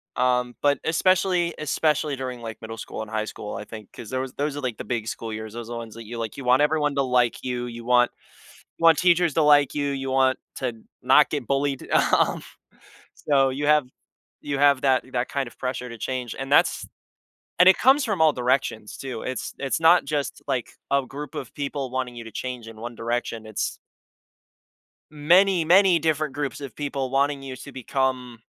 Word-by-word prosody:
Um, 125 -1 +1
but 145 0 +3
especially 175 +1 +2
especially 155 -1 0
during, 130 -2 -6
like, 115 -1 -8
middle 115 0 -7
school - - -6
and 110 - -7
high 110 0 -2
school, 105 -1 -7
I - - -5
think, 110 -2 -11
'cause 110 - -10
those 130 0 -3
those 145 0 -2
are, 145 - -5
like, 125 -5 -3
the - - -6
big 110 0 -3
school 115 -1 -5
years, 110 0 -7
those 120 -1 -7
are 120 - -4
ones 115 -2 -8
that 115 - -9
you, 115 +2 -7
like, 115 -2 -5
you 140 - -6
want 125 +2 +4
everyone 150 -1 +2
to 140 - +2
like 125 -3 +1
you, 125 -1 -3
you 120 -1 -8
want 125 0 +3 0.7
you - - -8
want 165 -2 +7
teachers 175 -2 +3
to 160 - +2
like 145 -2 +5
you, 145 -1 0
you 135 -1 -3
want 130 0 +2 0.2
to 120 - -2 0.3
not - - +5
get 145 -5 -3
bullied. 140 0 -1
Um, - - +3 0.7
so, 135 -2 +2
you 140 +3 -3
have 150 -2 +4 0.6
you 140 -1 -3
have 140 -1 +4
that 135 -2 +3
that 120 +1 -1
kind 140 -2 -2
of - - -14
pressure 125 -1 -3
to 115 - -8
change, 125 -3 -4
and 135 +1 -6
that's 145 - +3 0.7
and 180 +1 +8
it 190 - +7
comes 270 +3 +5
from 200 -8 0
all 155 -1 +6
directions, 125 -4 -1
too, 130 -4 -6
it's 130 -2 -4
it's 135 +3 -1
not 165 +2 +6
just, 145 -2 -3
like, 125 -3 -2 0.2
a 140 -1 +2
group 145 +2 -8
of 125 - -6
people 140 -2 -4
wanting 125 -1 -3
you 115 - -7
to 115 - -11
change 125 -3 -5
in 115 - -11
one 120 +2 -7
direction, 115 -1 -3
it's 110 -1 -3 1.3
many, 170 +4 +4
many 180 +1 +5
different 155 -2 0
groups 145 -1 -4
of 135 -6 -8
people 140 -3 -3
wanting 140 +1 +1
you 135 -1 -6
to 135 +2 -10
become 130 -2 -2
135 Hz, 205 wpm, -24 LUFS, 120-145 Hz, 1.3 s, and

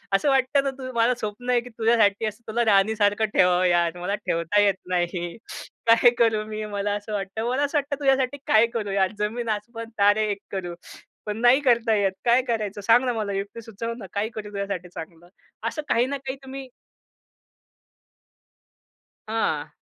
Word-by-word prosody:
असं 240 +9 +2
वाटतं 270 +1 +2
ना 275 - 0
तु 260 -1 -6
मला 235 +2 +3
स्वप्न 230 +2 -6
आहे 245 -1 +3
की 245 - -11
तुझ्यासाठी 225 -2 +2
असं 215 +1 -5
तुला 235 +2 0
राणीसारखं 205 +1 +3
ठेवावं 180 0 +4
यार, 175 -1 +2
मला 180 +3 -2
ठेवता 185 -1 0
येत 200 -2 +3
नाही. 175 -1 -2 0.5
काय 230 +2 +7
करू 220 -2 +2
मी 215 0 -5
मला 205 -1 -2
असं 205 +1 -6
वाटतं. 205 +3 -3
मला 265 +3 0
असं 290 +1 0
वाटतं 285 0 -2
तुझ्यासाठी 270 -1 +2
काय 220 +1 +5
करू 210 -4 -2
यार! 195 -1 +1
जमीन 225 +2 -2
आसमान 225 +2 -4
तारे 205 +2 +4
एक 200 - -3
करू, 180 -3 -4 0.5
पण 210 0 -3
नाही 245 +3 +6
करता 235 -4 +3
येत. 200 -2 +2
काय 240 +2 +5
करायचं? 210 -3 -2
सांग 230 +5 +4
ना 250 - 0
मला 215 -3 -3
युक्ती 200 +3 -5
सुचव 230 +1 -5
ना 220 - -8
काय 205 +2 -1
करू 210 -1 -6
तुझ्यासाठी 200 -3 -4
चांगलं?" 170 0 -10 0.4
असं 305 - -5
काही 235 - +3
ना 280 +2 -3
काही 260 +1 -3
तुम्ही 270 0 -8 2.6
हां. 225 +1 -1
215 Hz, 175 wpm, -24 LUFS, 200-240 Hz, 2.6 s, काय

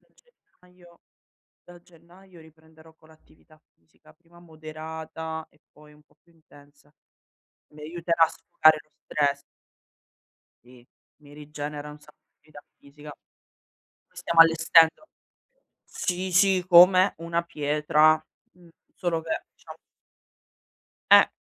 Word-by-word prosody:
da - - -37
gennaio 180 - -26 0.6
da 175 0 -16
gennaio 175 +1 -21
riprenderò 160 0 -21
con 160 0 -25
l'attività 155 0 -25
fisica, 85 - -26
prima 170 +1 -24
moderata 160 0 -9
e 150 - -31
poi 150 0 -20
un 150 - -23
po' - - -34
più 170 - -31
intensa. 145 -2 -23 0.8
Mi 150 - -18
aiuterà 170 +1 0
a - - -3
sfogare 155 0 +1
lo 155 - -40
stress. 140 -1 -2 1.2
Sì, 125 0 -20 0.4
mi 145 -1 -18
rigenera 150 0 -9
un 150 - -14
sa 150 0 -21 0.3
vita 150 -1 -17 0.2
fisica. 145 +1 -14 1.0
Stiamo 165 -1 0
allestendo 165 - +4 0.8
sì, 185 +1 -5
sì 185 0 +2
come 185 +2 +6
una 170 +1 -3
pietra, 150 0 +1 0.3
mhmm, 175 -1 -22 0.3
solo 170 -2 -3
che 160 0 -5
diciamo - - -14 1.4
Eh, - - +7
160 Hz, 115 wpm, -24 LUFS, 150-170 Hz, 1.4 s, Eh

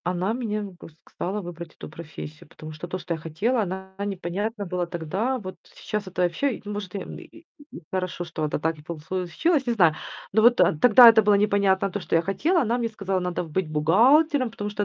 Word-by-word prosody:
Она 180 +4 -1
меня 215 -4 -3 0.2
кс 160 - -13
стала 200 +4 -4
выбрать 170 -2 -9
эту - - -9
профессию, 155 -1 -10
потому 155 0 -10
что 155 +3 -8
то, 180 - -4
что 175 -1 -4
я 160 - -5
хотела, 200 +11 -1
она 190 0 -5
непонятно 200 +3 -3
была 180 -1 -2
тогда. 185 +10 -2
Вот 185 -5 -8
сейчас 210 -2 -6
это 180 -1 -1
вообще, 220 +8 0
может, 205 -2 -6
и - - -1
м - - -8
и - - -11 0.5
и - - -9
х 165 - -27
хорошо, 185 -1 -3
что 160 -2 -4
это 150 - -2
так 160 0 -2
и - - -12
полслу 170 +3 -5
чилось. 290 - +1
Не 240 - +2
знаю, 175 -8 +4 0.4
но 220 - +4
вот, 240 +2 +5
а, - - +4
тогда 240 +4 +9
это 225 -1 +8
было 205 -1 +4
непонятно 200 -2 +2
то, 205 - -3
что 175 - -2
я 165 - +3
хотела. 305 - +1
Она 240 +1 0
мне 230 -1 -1
сказала: 195 -3 -2
"Надо 180 -1 -2
в 160 - -11
быть 175 0 -1
бухгалтером, 250 - +4
потому 210 -2 -5
что 205 0 -2
190 Hz, 225 wpm, -25 LUFS, 170-220 Hz, 0.5 s, тогда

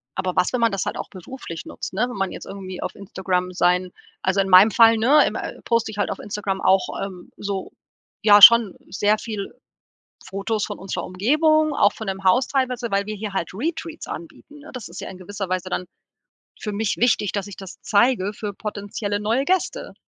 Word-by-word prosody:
Aber 185 -1 -3
was, 180 - +2
wenn 250 - 0
man 230 -2 +3
das 195 - -2
halt - - -3
auch - - -6
beruflich 185 -2 -9
nutzt, - - -7
ne? 220 +6 +1
Wenn 250 - -7
man 195 -1 -2
jetzt - - -8
irgendwie 190 -2 -8
auf - - -5
Instagram 185 -2 -2
sein 180 0 +1 0.3
also 190 +1 +1
in 195 - +2
meinem 190 +4 +8
Fall, 225 +2 +6
ne, 265 +7 +5
ähm, - - -4
äh, - - -6
poste 230 -2 0
ich 210 - -10
halt 205 - 0
auf - - -4
Instagram 200 -2 -4
auch, 190 0 +3 0.2
ähm, 185 -3 -11
so 200 -2 -5 0.5
ja 205 -1 +7
schon 230 -3 +9
sehr 205 +2 +2
viel 210 -4 -6 0.7
Fotos 200 +2 -2
von 205 - -7
unserer 190 -1 -4
Umgebung, 305 - +2
auch 205 - +4
von 220 -3 -8
dem 195 0 -4
Haus 245 +8 +3
teilweise, 250 -3 -1
weil 200 0 0
wir 215 - -4
hier 210 -1 -6
halt 170 - -2
Retreats 320 - -4
anbieten. 315 -3 -9
Ne, 300 - -12
das 250 -6 -7
ist 170 - -9
ja - - -6
in 185 - -10
gewisser 195 0 -6
Weise 185 0 -2
dann 180 0 -3 0.7
für 210 - -4
mich 210 +1 -1
wichtig, 225 -4 +2
dass 200 -1 -3
ich 200 - -9
das 195 -2 -11
zeige 210 -2 +2
für 210 -1 -6
potenzielle 205 0 -4
neue 225 +6 0
Gäste. 375 0 -1
205 Hz, 210 wpm, -22 LUFS, 190-235 Hz, 0.7 s, schon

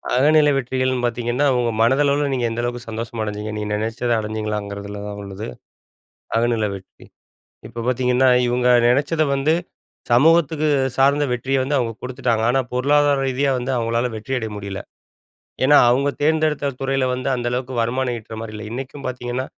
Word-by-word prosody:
அகநிலை 150 +2 +5
வெற்றிகள்ன்னு 130 -1 -1
பாத்தீங்கன்னா, 120 +4 -1
ஒங்க 120 -1 +1
மனதளவுல 140 +4 +2
நீங்க 125 -2 0
எந்த 120 +1 -2
அளவுக்கு 120 -1 -4
சந்தோஷமடைஞ்சீங்க, 110 -2 -4
நீங்க 105 0 -4
நெனச்சத 115 +3 -2
அடஞ்சிங்களாங்கிறதுல 105 -2 -4
தான் 105 0 -6
உள்ளது, 100 +2 -7 0.9
அகநிலை 115 -3 +1
வெற்றி. 95 -1 -14 0.6
இப்ப 115 - -7
பாத்தீங்கன்னா, 125 +1 +2 0.2
இவுங்க 125 +1 +1 0.2
நெனச்சத 145 +6 +2
வந்து 145 +4 +2 0.6
சமூகத்துக்கு 155 +3 +4 0.3
சார்ந்த 140 +2 +4
வெற்றிய 135 +3 -1
வந்து 145 +2 -1
அவுங்க 115 -2 -2
கொடுத்துட்டாங்க. 125 -3 -1
ஆனா, 135 0 +2
பொருளாதார 145 +2 +3
ரீதியா 135 +2 +1
வந்து 125 +2 -3
அவுங்களால 115 +1 0
வெற்றியடைய 115 -1 -3
முடியல. 100 -1 -5 0.9
ஏன்னா, 145 +1 +6
அவுங்க 140 +3 +2
தேர்ந்தெடுத்த 155 -3 +1
துறையில 135 -1 0
வந்து 130 +2 -3
அந்த 120 -1 -4
அளவுக்கு 130 +1 -3
வருமானம் 125 +1 -1
ஈட்றமாரி 110 0 -8
இல்ல. 105 0 -7
இன்னைக்கும் 135 +3 -7
பாத்தீங்கன்னா, 125 +1 -3
125 Hz, 140 wpm, -21 LUFS, 115-135 Hz, 0.9 s, ஏன்னா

